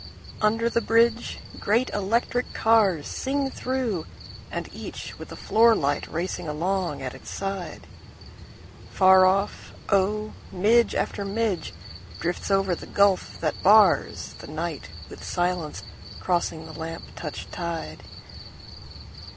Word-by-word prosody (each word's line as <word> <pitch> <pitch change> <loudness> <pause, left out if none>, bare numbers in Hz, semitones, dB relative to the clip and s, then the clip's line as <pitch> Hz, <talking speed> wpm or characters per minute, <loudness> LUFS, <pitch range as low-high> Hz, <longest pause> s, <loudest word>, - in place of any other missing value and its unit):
Under 225 +2 +2
the 235 0 +1
bridgeGreat 230 0 +1
electric 230 +5 0
carsSing 225 - +1
through, 245 -10 -2 0.4
and - - -4
each - - -8
with - - -9
a - - -6
floor 230 +1 +4
light 145 -4 0
racing 170 0 -3
along 170 0 -1
at 130 - -4
its - - -11
side. 195 -2 -5 1.0
Far 190 -1 +6
off, 195 +2 0 0.2
oh, 210 +2 +1 0.2
midge 225 +6 +3
after 200 - -1
midgeDrifts 165 - -4
over 195 -2 +2
the - - -6
gulf 200 -2 +2
that 155 -2 -1
barsThe 210 +2 +3
night - - -4 0.2
with - - -11
silence, 175 -3 -2 0.4
crossing 170 -3 -1
the 160 - -10
lamp 165 +1 -6
touched 150 -3 -6
tide. 165 - -5
195 Hz, 110 wpm, -25 LUFS, 165-220 Hz, 1.0 s, Far